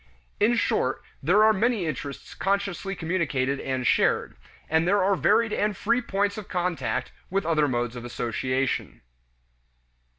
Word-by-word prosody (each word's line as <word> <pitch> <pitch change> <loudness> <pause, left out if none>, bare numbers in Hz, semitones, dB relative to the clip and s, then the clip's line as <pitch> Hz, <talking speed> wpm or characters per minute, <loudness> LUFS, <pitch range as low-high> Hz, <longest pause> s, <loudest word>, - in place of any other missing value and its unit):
In 225 +4 +4
short, 135 - 0 0.2
there 185 +9 +4
are 220 0 +6
many 220 -1 +1
interests 140 -2 -5
consciously 195 0 -1
communicated 145 -6 -1
and 130 -2 -2
shared; - - +2 0.3
and 160 +2 +2
there 200 +1 +3
are 195 +1 +3
varied 220 +3 +2
and 210 -1 0
free 275 -2 +1
points 200 -2 -1
of 205 - -9
contact 175 -7 -2 0.2
with 195 +2 -1
other 155 -3 +2
modes 120 -2 -1
of 120 - -7
association. 120 - -2
175 Hz, 140 wpm, -26 LUFS, 135-200 Hz, 0.3 s, are